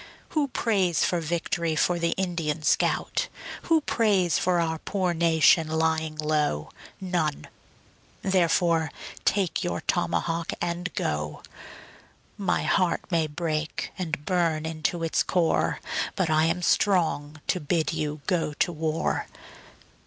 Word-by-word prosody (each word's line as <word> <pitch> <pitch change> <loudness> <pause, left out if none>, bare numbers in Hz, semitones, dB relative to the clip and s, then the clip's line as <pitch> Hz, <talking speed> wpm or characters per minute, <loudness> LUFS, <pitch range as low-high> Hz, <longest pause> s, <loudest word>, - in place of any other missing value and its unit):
Who 300 -3 +1
prays 195 - +1
for 175 -1 0
vict'ry 165 0 -1
for 175 +2 +2
the 170 0 +1
Indian 165 -5 -2
scout? - - +1 0.4
Who 325 -1 +5
prays 200 - +2
for 180 -1 +2
our 160 -1 -1
poor 185 -1 -1
nation 165 -1 +4
lying 160 0 0
low? 150 - 0 0.3
None 175 -6 -1 0.8
therefore 170 -3 +2 0.3
take 195 -2 +1
your 175 - -2
tomahawk 170 -1 -1
and 175 +1 -2
go. 75 0 -2 0.9
My 195 -2 0
heart 185 -3 +2
may 165 -2 +2
break 155 0 -3
and 165 -5 -4
burn 165 -4 +1
into 160 +1 -2
its 165 - +1
core, 175 -3 +1 0.4
But 180 -5 0
I 155 0 +4
am 170 +2 0
strong 160 -7 +1
to 180 - 0
bid 160 0 0
you 150 -2 -3
go 165 -4 0
to 175 +4 0
war. 160 -1 -1
165 Hz, 125 wpm, -26 LUFS, 155-180 Hz, 0.9 s, Who